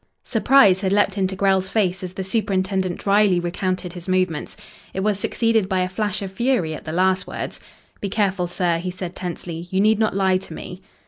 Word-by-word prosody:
Surprise 220 -5 +4
had 190 -2 0
leapt 205 -1 +3
into 190 -1 0
Grell's 190 -1 +2
face 190 -4 0
as 185 -1 -6
the 190 - -3
superintendent 190 -3 -1
drily 200 -2 +3
recounted 180 +1 -2
his 175 0 -9
movements. 185 -4 -1 0.4
It 190 - -1
was 205 -1 0
succeeded 225 -2 +1
by 190 -2 +1
a 180 - +1
flash 205 +1 -1
of 190 - -5
fury 225 -6 0
at - - -8
the 155 - -4
last 185 +2 +1
words. - - -5 0.4
"Be 200 - -3
careful, 195 -3 0
sir," 175 -1 0
he 180 +2 -4
said 180 -1 -6
tensely. 175 -1 -6
"You 190 - 0
need 215 +1 +4
not 215 -3 +1
lie 190 -1 +3
to 180 - -10
me." 180 +1 -8
190 Hz, 200 wpm, -22 LUFS, 180-200 Hz, 0.4 s, Surprise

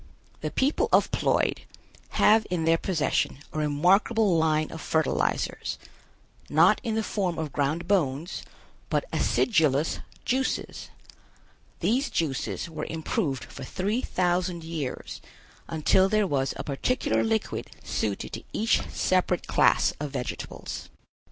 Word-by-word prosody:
The - - -3
people 275 +3 +1
of - - +4
Ploid - - +1 0.6
have 215 +1 +5
in 175 -3 -1
their 165 0 +4
possession 165 -7 0 0.2
a 155 - -2
remarkable 185 +7 +3
line 155 -1 +2
of 160 - -7
fertilizers, 160 -1 0 0.7
not - - +5
in 225 -2 -1
the 220 - 0
form 185 -5 -1
of 155 -3 -3
ground 150 +4 -1
bones, 165 -4 0 0.5
but - - 0
acidulous 155 - +2 0.3
juices. 260 +1 -1 0.9
These 255 +6 +1
juices 150 -2 -2
were 155 -2 -5
improved 160 - -2
for - - -9
three 205 +6 -1
thousand 180 -3 0
years 160 -5 -5 0.5
until 165 +4 +3
there 215 0 +3
was 135 -6 0
a - - -4
particular 150 - 0
liquid 220 -1 -1
suited - - -2
to - - -5
each 220 +2 +2
separate 185 -1 +1
class - - +3
of 150 0 -3
vegetables. 130 -3 -5
170 Hz, 125 wpm, -27 LUFS, 155-205 Hz, 0.9 s, have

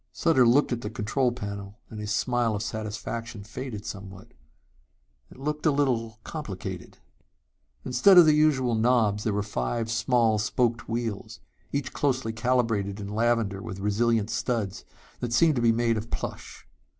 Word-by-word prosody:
Sutter 145 -8 +3
looked 130 +5 +4
at 120 -1 -1
the 105 - -4
control 120 +3 0
panel 100 -2 -7
and 110 - -7
his 105 0 -5
smile 120 0 +1
of 105 - -3
satisfaction 110 +1 -5
faded 115 -1 -7
somewhat. 95 -1 -9 1.0
It - - -15
looked 150 +3 -2
a - - +5
little 120 -6 0
complicated.... 110 - -7 0.9
Instead 185 +9 +5
of 175 - +10
the 155 - +5
usual 145 -5 +3
knobs 110 -3 +2
there 110 - +1
were 105 0 0
five 105 - -2
small 115 -2 +2
spoked 115 +2 0
wheels, 115 -3 -4 0.3
each 140 -2 -3
closely 130 -5 0
calibrated 110 -4 0
in 100 -1 -6
lavender 110 -2 0
with 100 -4 -7
resilient 110 +2 +1
studs 115 -4 -2 0.3
that 120 -1 -3
seemed 155 +5 +4
to - - +1
be 115 -1 +5
made 115 0 +1
of 110 +2 -5
plush. - - -6
115 Hz, 155 wpm, -26 LUFS, 105-125 Hz, 1.0 s, of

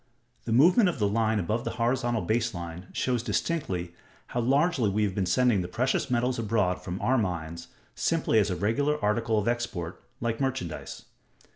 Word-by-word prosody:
The 115 - -3
movement 180 - +5
of 170 - -3
the 105 -4 +2
line 110 +1 +1
above 105 +5 -1
the - - -2
horizontal 120 -1 0
baseline 90 -7 -2
shows 125 -3 0
distinctly 95 - -2 0.4
how 120 - -2
largely 135 - +2
we 105 +2 +1
have 100 -2 0
been 95 -1 -1
sending 115 +1 +3
the 90 - -4
precious 130 +8 0
metals 125 0 +1
abroad 105 -5 0
from 90 0 -5
our 130 0 +3
mines, 85 -4 -3 0.3
simply 110 - +1
as 105 -1 +2
a 90 - -1
regular 140 +11 0
article 110 +1 +1
of 105 - 0
export, 115 -8 -2 0.2
like 115 +1 -2
merchandise. 130 - -3
115 Hz, 170 wpm, -27 LUFS, 95-125 Hz, 0.4 s, movement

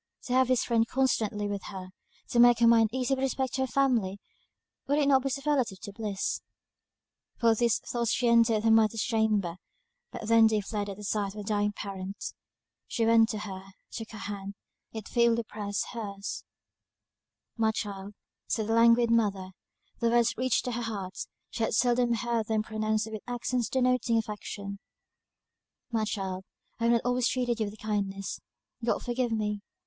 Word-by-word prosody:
To 250 - -3
have 260 0 +4
this 255 -1 +2
friend 230 -1 +2
constantly 225 -6 0
with 200 -1 -4
her; 185 -2 -7 0.4
to 240 - +1
make 240 0 +7
her 235 - +4
mind 230 -1 +6
easy 260 +2 0
with 265 - -1
respect 265 -1 -1
to 265 - -1
her 265 - +1
family, 235 -7 +1 0.7
would 285 +2 +2
it 290 -2 +3
not 270 -2 +5
be 275 - -1
superlative 270 -6 0 0.2
bliss? 205 -2 -2 1.0
Full 230 -1 +5
of 225 - 0
these 235 -2 +3
thoughts 235 -2 -2
she 245 - +1
entered 230 -2 +4
her 225 - +4
mother's 220 -1 +4
chamber, 215 -6 +1 0.5
but - - -7
they - - -6 0.2
then 220 - +7
fled 205 0 -3
at 195 - -6
the 210 - -9
sight 205 -1 -1
of 210 - -5
a - - -7
dying 205 0 0
parent. 195 0 -6 0.5
She 230 - 0
went 225 0 +5
to 220 - -2
her, 190 -3 -6 0.3
took 225 -1 -6
her 220 - -9
hand; 200 -1 -6 0.4
it 220 -2 -7
feebly 235 -1 +3
pressed 205 -2 -3
her's. 200 -4 -5 1.1
"My 225 -2 +2
child," 200 -1 -5 0.3
said 220 -3 -1
the 225 - 0
languid 230 +1 +5
mother: 200 -5 +1 0.5
the 235 - +2
words 235 0 +3
reached 255 -1 +1
her 250 - -1
heart; 200 -5 -5 0.2
she - - -5
had 225 - +1
seldom 245 -1 +3
heard 235 -1 -1
them 220 -1 +1
pronounced 215 0 -1
with 215 -2 -5
accents 245 0 -1
denoting 250 -2 +2
affection; 200 -2 -5 1.1
"My 220 -2 +1
child, 190 -3 -3 0.4
I 230 - 0
have 235 - +4
not 235 - +1
always 245 0 +2
treated 245 -2 0
you 215 - 0
with 205 +1 -9
kindness 200 -2 -3 0.4
God 230 - 0
forgive 245 -1 -1
me! 210 -2 -1
225 Hz, 175 wpm, -29 LUFS, 205-240 Hz, 1.1 s, make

